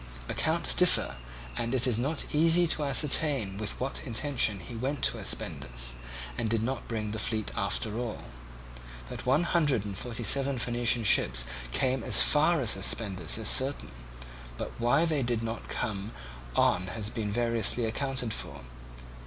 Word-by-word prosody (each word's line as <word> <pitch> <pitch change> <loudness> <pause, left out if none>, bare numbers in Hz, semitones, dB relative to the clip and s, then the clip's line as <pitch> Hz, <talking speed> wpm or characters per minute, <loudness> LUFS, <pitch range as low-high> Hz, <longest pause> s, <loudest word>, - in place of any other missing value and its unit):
Accounts 65 - +1
differ, - - +2 0.4
and 115 - -2
it 125 0 +4
is 120 -3 +1
not 145 +5 -1
easy 165 +3 +4
to 155 -2 +2
ascertain 135 -6 +1
with 105 -1 -4
what 135 +2 -1
intention 115 -4 +1
he 120 - -10
went 130 +4 -3
to - - +3
Aspendus, - - -3 0.5
and 110 - -1
did 110 0 +1
not 130 +1 -3
bring 110 -2 -3
the 110 - -3
fleet 110 -1 -1
after 110 -1 0
all. 120 -3 -5 0.9
That - - -7
one 140 +6 +3
hundred 145 - +1
and 100 -2 -5
forty 120 +3 -4
seven 135 +4 +2
Phoenician 120 0 +1
ships 60 - +3 0.3
came 130 - +1
as - - +5
far 155 +1 +3
as 115 -6 +1
Aspendus 95 -1 -1
is 110 - -2
certain; 135 - +3 0.7
but - - -5
why 125 +7 +3
they 155 -4 0
did 120 -2 -1
not 115 0 -5
come 105 0 -3 0.4
on 90 +1 +2
has 110 +2 -3
been 110 -4 -3
variously 115 +1 0
accounted 125 0 -1
for. - - -5
120 Hz, 160 wpm, -29 LUFS, 105-135 Hz, 0.9 s, as